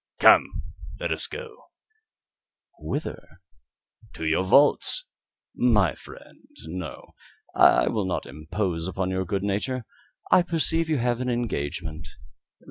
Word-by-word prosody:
"Come, -, -, +5 dB, 0.4 s
let -, -, -2 dB
us -, -, -1 dB
go." 475 Hz, 0 st, -9 dB, 1.1 s
"Whither?" 140 Hz, -, -6 dB, 0.7 s
"To 80 Hz, -, -6 dB
your 80 Hz, +3 st, +2 dB
vaults." 145 Hz, -, +4 dB, 0.5 s
"My 105 Hz, -, +3 dB
friend, -, -, -15 dB, 0.2 s
no; 85 Hz, -1 st, -7 dB, 0.4 s
I -, -, +5 dB
will 110 Hz, -4 st, 0 dB
not 95 Hz, -, -2 dB
impose 80 Hz, +5 st, -3 dB
upon 95 Hz, 0 st, -2 dB
your 95 Hz, 0 st, -1 dB
good 95 Hz, +2 st, -2 dB
nature. 105 Hz, +5 st, -2 dB, 0.5 s
I -, -, +7 dB
perceive 165 Hz, -1 st, 0 dB
you 155 Hz, -, +2 dB
have 120 Hz, 0 st, 0 dB
an 125 Hz, -, -1 dB
engagement. 80 Hz, -9 st, -3 dB
100 Hz, 120 wpm, -25 LUFS, 85-130 Hz, 1.1 s, I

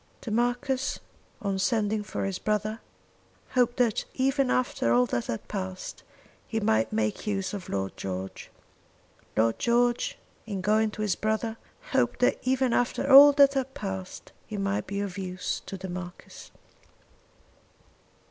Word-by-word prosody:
The 225 Hz, -, -6 dB
Marquis 245 Hz, +3 st, 0 dB, 0.5 s
in 195 Hz, -1 st, 0 dB
sending 215 Hz, 0 st, +1 dB
for 205 Hz, -, -4 dB
his 195 Hz, -1 st, -3 dB
brother 215 Hz, +1 st, -1 dB, 0.7 s
hoped 245 Hz, -1 st, +2 dB
that 240 Hz, -4 st, +2 dB
even 270 Hz, 0 st, +2 dB
after 245 Hz, -, +1 dB
all 125 Hz, +1 st, +5 dB
that 120 Hz, -1 st, -2 dB
had 115 Hz, -, -4 dB
passed, 190 Hz, -2 st, -5 dB, 0.5 s
he 225 Hz, -, -1 dB
might 110 Hz, -, +2 dB
make 110 Hz, -, -1 dB
use 195 Hz, -2 st, -1 dB
of 195 Hz, -3 st, -6 dB
Lord 95 Hz, 0 st, -2 dB
George. 95 Hz, 0 st, -6 dB, 0.9 s
Lord 115 Hz, +1 st, +2 dB
George 240 Hz, 0 st, +1 dB, 0.3 s
in 200 Hz, -3 st, -3 dB
going 215 Hz, +3 st, +3 dB
to 215 Hz, 0 st, -5 dB
his 200 Hz, -4 st, +1 dB
brother, 220 Hz, +1 st, -1 dB, 0.4 s
hoped -, -, +2 dB
that -, -, +3 dB
even 260 Hz, -1 st, +1 dB
after 245 Hz, +2 st, +1 dB
all 285 Hz, +2 st, +11 dB
that 280 Hz, -1 st, +6 dB
had 265 Hz, -1 st, -2 dB
passed 190 Hz, -2 st, -6 dB, 0.2 s
he 215 Hz, -, -5 dB
might 195 Hz, 0 st, -1 dB
be 200 Hz, 0 st, -2 dB
of 200 Hz, -1 st, -4 dB
use 185 Hz, -1 st, -3 dB
to 195 Hz, -, -5 dB
the 190 Hz, 0 st, -6 dB
Marquis. 180 Hz, 0 st, -8 dB
210 Hz, 150 wpm, -27 LUFS, 185-240 Hz, 0.9 s, all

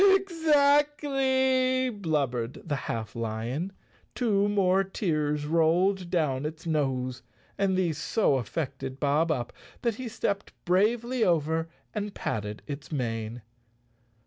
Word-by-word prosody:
"Exactly," 280 Hz, -6 st, +3 dB
blubbered 140 Hz, -, -2 dB
the 145 Hz, -, 0 dB
half 115 Hz, -4 st, -4 dB
lion. 115 Hz, -, -3 dB, 0.4 s
Two 205 Hz, -4 st, +2 dB
more 195 Hz, -1 st, +3 dB
tears 150 Hz, -6 st, -1 dB
rolled 170 Hz, +4 st, +2 dB
down 150 Hz, -7 st, +1 dB
its 155 Hz, +2 st, -5 dB
nose, 130 Hz, -5 st, -1 dB, 0.3 s
and 195 Hz, -1 st, +1 dB
these 170 Hz, -5 st, 0 dB
so 150 Hz, -, +2 dB
affected 130 Hz, +2 st, -4 dB
Bob 150 Hz, +3 st, +2 dB
Up 120 Hz, -6 st, -2 dB, 0.3 s
that 235 Hz, -3 st, 0 dB
he 255 Hz, -, -4 dB
stepped 200 Hz, -3 st, -2 dB
bravely 225 Hz, +7 st, +2 dB
over 160 Hz, -1 st, +1 dB, 0.2 s
and 210 Hz, -1 st, -3 dB
patted 105 Hz, 0 st, -3 dB
its 140 Hz, -1 st, -7 dB
mane. 115 Hz, -4 st, -3 dB
165 Hz, 115 wpm, -28 LUFS, 135-215 Hz, 0.4 s, Exactly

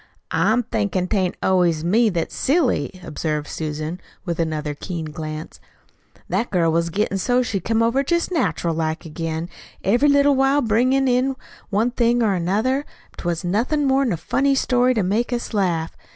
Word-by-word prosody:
"I'm 240 Hz, +3 st, +2 dB
thinkin' 200 Hz, -5 st, -1 dB
tain't 190 Hz, -4 st, 0 dB
always 175 Hz, -4 st, +2 dB
me 220 Hz, +7 st, +3 dB
that's 170 Hz, -4 st, -2 dB
silly," 265 Hz, -, +1 dB
observed 150 Hz, -1 st, -3 dB
Susan, 155 Hz, +2 st, -4 dB, 0.2 s
with 170 Hz, -2 st, -3 dB
another 155 Hz, -2 st, -1 dB
keen 165 Hz, +2 st, -5 dB
glance. 155 Hz, 0 st, -7 dB, 0.7 s
"That 200 Hz, +7 st, -1 dB
girl 170 Hz, -4 st, +2 dB
was 170 Hz, +1 st, +1 dB
gettin' 195 Hz, +2 st, -1 dB
so 250 Hz, +5 st, +2 dB
she 210 Hz, -5 st, -2 dB
come 225 Hz, +5 st, +1 dB
over 245 Hz, +4 st, +2 dB
jest 340 Hz, +5 st, 0 dB
natural 175 Hz, -, 0 dB
like 160 Hz, +1 st, -2 dB
again, 160 Hz, +1 st, -4 dB, 0.4 s
every 240 Hz, +9 st, +3 dB
little 285 Hz, 0 st, +5 dB
while, 270 Hz, +2 st, +3 dB
bringin' 255 Hz, +5 st, +2 dB
in 255 Hz, +2 st, +2 dB, 0.3 s
one 220 Hz, +4 st, +1 dB
thing 240 Hz, 0 st, +2 dB
or 210 Hz, -3 st, +2 dB
another, 205 Hz, +10 st, +1 dB, 0.3 s
if -, -, -25 dB
'twas 170 Hz, -1 st, -2 dB
nothin' 240 Hz, -, 0 dB
more'n 270 Hz, -2 st, +2 dB
a 175 Hz, -, -1 dB
funny 275 Hz, -, +1 dB
story 250 Hz, -1 st, +2 dB
to 215 Hz, -, +1 dB
make 215 Hz, +7 st, 0 dB
us 240 Hz, -1 st, -3 dB
laugh. 175 Hz, -6 st, 0 dB
205 Hz, 165 wpm, -22 LUFS, 170-250 Hz, 0.7 s, little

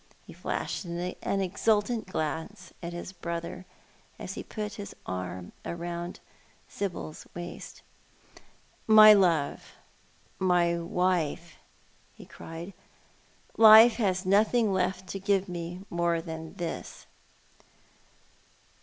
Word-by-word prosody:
He -, -, -12 dB
flashed -, -, -3 dB
an 180 Hz, +2 st, -3 dB
exultant 210 Hz, +4 st, 0 dB
glance 165 Hz, +3 st, -4 dB
at 170 Hz, 0 st, -5 dB
his 175 Hz, +2 st, -7 dB
brother, 170 Hz, +1 st, -6 dB, 0.5 s
as -, -, -6 dB
he -, -, -6 dB
\)\xt 210 Hz, -2 st, -5 dB
his 200 Hz, -1 st, -8 dB
arm 90 Hz, -1 st, -5 dB
round 170 Hz, 0 st, -5 dB, 0.5 s
Sibyl's 175 Hz, -5 st, -5 dB
waist. 175 Hz, 0 st, -8 dB, 0.5 s
" -, -, -26 dB
:\Iy 215 Hz, -1 st, +10 dB
love, 165 Hz, -6 st, 0 dB, 0.7 s
my 175 Hz, -2 st, +2 dB
wife," 170 Hz, -1 st, -1 dB, 0.6 s
he -, -, -13 dB
cried. 165 Hz, +4 st, -9 dB, 0.5 s
" -, -, -34 dB, 0.3 s
Life 225 Hz, +1 st, +9 dB
has 190 Hz, -5 st, 0 dB
nothing 210 Hz, +2 st, +3 dB
left 185 Hz, 0 st, -1 dB
to 195 Hz, -, -4 dB
give 195 Hz, 0 st, +1 dB
me 175 Hz, +1 st, -6 dB
more 170 Hz, -1 st, +1 dB
than 160 Hz, -1 st, -8 dB
this." 170 Hz, -2 st, -6 dB
180 Hz, 110 wpm, -28 LUFS, 170-200 Hz, 0.7 s, Iy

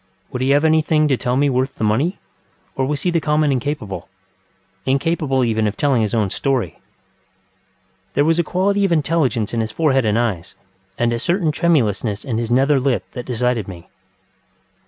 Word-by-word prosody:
Would 125 Hz, -, -4 dB
he 130 Hz, -, +1 dB
have 145 Hz, +3 st, +4 dB
anything 155 Hz, -1 st, +3 dB
to 135 Hz, -, +3 dB
tell 125 Hz, +1 st, -1 dB
me 145 Hz, +1 st, +3 dB
worth 130 Hz, 0 st, 0 dB
the -, -, -4 dB
money, 130 Hz, -, +1 dB, 0.6 s
or 130 Hz, -1 st, 0 dB
was 145 Hz, 0 st, -2 dB
he 180 Hz, -, +1 dB
the 170 Hz, -, +2 dB
common 150 Hz, -1 st, +2 dB
incapableŌĆöincapable 100 Hz, -, -3 dB
even 110 Hz, -2 st, +1 dB
of 105 Hz, -, -4 dB
telling 140 Hz, -5 st, +2 dB
his 110 Hz, +1 st, -1 dB
own 105 Hz, -4 st, 0 dB
story? 130 Hz, -, -1 dB, 1.4 s
There 145 Hz, -, +3 dB
was 165 Hz, +1 st, +2 dB
a -, -, +3 dB
quality 200 Hz, +4 st, +1 dB
of 195 Hz, -, +1 dB
intelligence 145 Hz, -9 st, +1 dB
in 115 Hz, -, 0 dB
his 110 Hz, 0 st, -3 dB
forehead 135 Hz, -6 st, +1 dB
and 105 Hz, 0 st, +2 dB
eyes, 100 Hz, -6 st, -2 dB, 0.4 s
and 120 Hz, 0 st, +1 dB
a 115 Hz, -, -2 dB
certain 170 Hz, -, +1 dB
tremulousness 120 Hz, -, 0 dB
in 115 Hz, -5 st, -2 dB
his 115 Hz, -1 st, -3 dB
nether 135 Hz, +3 st, +3 dB
lip 130 Hz, -1 st, 0 dB
that 125 Hz, -2 st, -7 dB
decided 125 Hz, -3 st, -1 dB
me. 85 Hz, -3 st, -10 dB
130 Hz, 175 wpm, -19 LUFS, 110-150 Hz, 1.4 s, have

